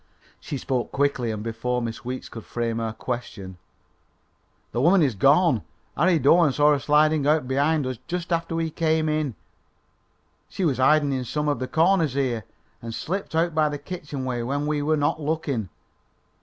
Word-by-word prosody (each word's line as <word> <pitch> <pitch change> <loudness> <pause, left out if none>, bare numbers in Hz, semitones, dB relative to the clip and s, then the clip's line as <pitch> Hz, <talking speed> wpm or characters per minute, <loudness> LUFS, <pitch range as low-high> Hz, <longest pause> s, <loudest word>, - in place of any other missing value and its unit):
She 145 - -5
spoke 130 -2 -2
quickly 140 -4 0
and 105 -1 -4
before 115 +2 -2
Miss 115 -2 -5
Weeks 130 +1 -5
could 115 - -9
frame 115 -1 -3
her 115 -1 -2
question. 110 -6 -6 1.1
"The 120 - -1
woman 175 +4 +5
is 135 -5 +1
gone. 140 - +4 0.3
Harry 170 +2 +3
Doane 155 +2 +5
saw 150 +2 +4
her 145 - +2
sliding 150 0 +3
out 150 -3 +2
behind 145 +3 +1
us 130 -3 -4
just 175 0 -3
after 165 0 -1
we 165 -1 -1
came 160 -1 +1
in. 155 -5 -1 1.1
She 190 - -2
was 135 -6 0
hiding 145 +2 +4
in 130 -1 -2
some 150 +5 -2
of 145 - 0
the 130 - -3
corners 165 -2 +2
here, 125 -6 -1 0.4
and 115 -1 -6
slipped 190 -1 -4
out 165 +1 +1
by 155 -1 +2
the 145 - -4
kitchen 145 -3 -6
way 125 -2 -2
when 140 +5 -2
we 150 -1 0
were 155 +2 +1
not 145 +2 0
looking. 145 - -2
145 Hz, 180 wpm, -24 LUFS, 125-155 Hz, 1.1 s, woman